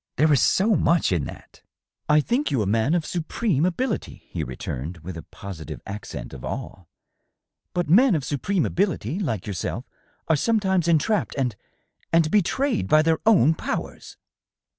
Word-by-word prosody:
There 155 +2 +4
is 135 - +4
so 210 +3 +3
much 165 - +2
in 85 -6 +1
that - - -11
!" - - -67
" - - -50
I 150 0 +6
think 250 - 0
you 130 -6 +1
a - - -2
man 115 - +2
of 165 -3 0
supreme 175 - 0
ability," 225 +6 -3
he - - -2
returned, 65 +6 -5
with 90 +1 -6
a 80 - -6
posi 80 -3 -9
tive - - -6
accent 100 -6 -7
of 65 - -9
awe. 95 - -6 0.4
" - - -57
But 175 -3 0
men 215 - +5
of 150 - -1
supreme 165 +7 0
ability, 170 - -1
like 115 - -2
yourself, 100 -5 -4 0.4
are 160 - +4
sometimes 190 -1 +1
entrapped 170 +6 +1
and.. 125 -6 -1 0.6
and 165 -2 +3
betrayed 225 +5 +1
by 155 +1 +5
their 160 0 +2
own 165 - +6
powers." - - -5
155 Hz, 175 wpm, -24 LUFS, -, 0.6 s, I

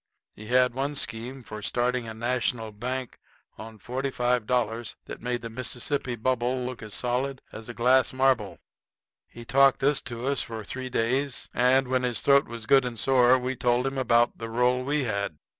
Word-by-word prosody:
He 110 - -11
had 125 +1 +3
one 140 +3 -2
scheme 125 +1 -3
for 110 -1 -8
starting 125 +2 -1
a 110 - -7
National 120 -1 -1
bank 125 +4 -5 0.4
on 110 0 -9
$45 125 -2 -1
that - - -9
made 120 0 -3
the 115 - -5
Mississippi 125 +2 -2
Bubble 125 +2 -1
look 125 -1 -6
as 110 -2 -4
solid 130 +2 -1
as 110 +1 -9
a 120 - -7
glass 125 +1 +4
marble. 130 -5 +1 0.7
He 120 - -12
talked 135 +2 +4
this 145 +2 +2
to 120 +1 -5
us 140 0 +2
for 110 -1 -6
three 130 +5 -6
days, 130 +3 -1
and 130 +2 +3
when 130 0 +1
his 125 -4 -1
throat 140 0 +4
was 115 -2 -7
good 135 +1 +5
and 125 -2 -4
sore 130 +1 +4
we 130 +1 -3
told 120 +1 +1
him 135 0 -2
about 120 -1 +2
the 115 -1 -5
roll 125 +2 +1
we 145 +2 0
had. 100 -8 -2
125 Hz, 180 wpm, -26 LUFS, 115-130 Hz, 0.7 s, good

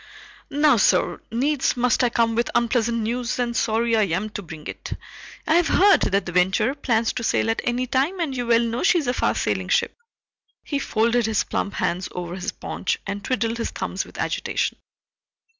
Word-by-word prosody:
"Now, 290 -2 +4
sir, 210 - +2
needs 270 +3 0
must 245 +1 +2
I 245 - +3
come 230 -1 +1
with 235 +1 0
unpleasant 235 -1 +1
news, 240 +2 -2
and 240 -1 -1
sorry 230 0 +1
I 215 -2 +3
am 190 +5 -2
to 205 - -5
bring 160 -4 -10
it. - - -6 0.5
I 315 - +2
have 345 -2 +3
heard 400 +2 +5
that 200 +1 +1
the 175 - -5
Venture 190 +8 +2
plans 235 -5 0
to 245 - -4
sail 225 - +1
at 225 - -2
any 245 +1 0
time, 270 +8 0
and 305 -6 -2
you 245 -1 -3
well 230 0 +4
know 235 +1 -2
she 360 - +4
is 315 - -1
a 245 - 0
fast - - 0
sailing - - -1
ship." - - +1 0.7
He 285 - -2
folded 235 -2 +1
his 220 -2 +1
plump 200 - -3
hands 180 +2 -1
over 175 -1 -5
his 190 +3 -3
paunch - - -3
and 200 0 -4
twiddled 235 -2 -1
his 230 - -1
thumbs - - -3
with - - -14
agitation. - - -2
235 Hz, 200 wpm, -23 LUFS, 215-255 Hz, 0.7 s, heard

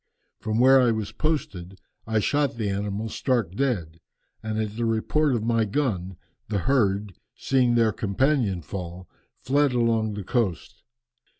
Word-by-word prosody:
From 110 -1 -2
where 130 +1 +7
I 125 - +4
was 110 -2 -2
posted 95 - -3 0.3
I 110 0 0
shot 145 +1 +1
the 105 -3 -1
animal 100 +2 -3
stark 115 -5 -1
dead, 95 -10 -2 0.4
and 110 0 -3
at 110 -1 -3
the 115 +1 -1
report 125 +6 +1
of 110 - -2
my 115 0 +2
gun 100 - -2 0.3
the 105 - -1
herd, 100 -2 +1 0.2
seeing 125 -3 +2
their 115 -2 +3
companion 105 - 0
fall, 90 +2 -7 0.3
fled 140 0 +1
along 115 -3 +1
the 105 - -5
coast. 100 -5 -2
110 Hz, 145 wpm, -25 LUFS, 100-125 Hz, 0.4 s, where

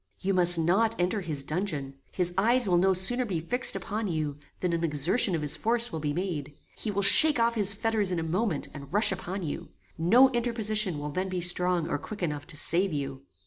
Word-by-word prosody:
"You 195 +1 -2
must 175 -1 +3
not 195 +8 +1
enter 180 +4 -1
his 155 -6 -3
dungeon; 150 -4 -4 0.2
his 180 -1 -1
eyes 235 +4 +3
will 175 -2 +2
no 190 +2 +2
sooner 190 +7 +3
be 190 -8 -4
fixed 245 +11 +2
upon 215 +1 -5
you, 155 -4 -4 0.2
than 180 -2 -2
an 170 0 -2
exertion 170 - +1
of 155 - -4
his 145 - 0
force 235 +1 0
will 160 - -5
be 150 -1 -3
made. 150 -4 -5 0.2
He 220 - -6
will 200 -1 -2
shake 300 +6 +8
off 230 0 +1
his 205 -3 +1
fetters 215 -2 0
in 180 - -2
a 165 - -3
moment, 175 0 -2
and 140 -2 -11
rush 205 +3 +3
upon 190 0 -6
you. 150 - -6 0.3
No 245 +11 +4
interposition 215 - 0
will 145 0 -6
then 185 +5 -4
be 185 -1 -4
strong 175 -1 0
or - - -3
quick 205 +6 -9
enough 150 -3 -4
to 155 - -9
save 180 +5 +1
you. 135 -2 -6
180 Hz, 220 wpm, -26 LUFS, 160-215 Hz, 0.3 s, shake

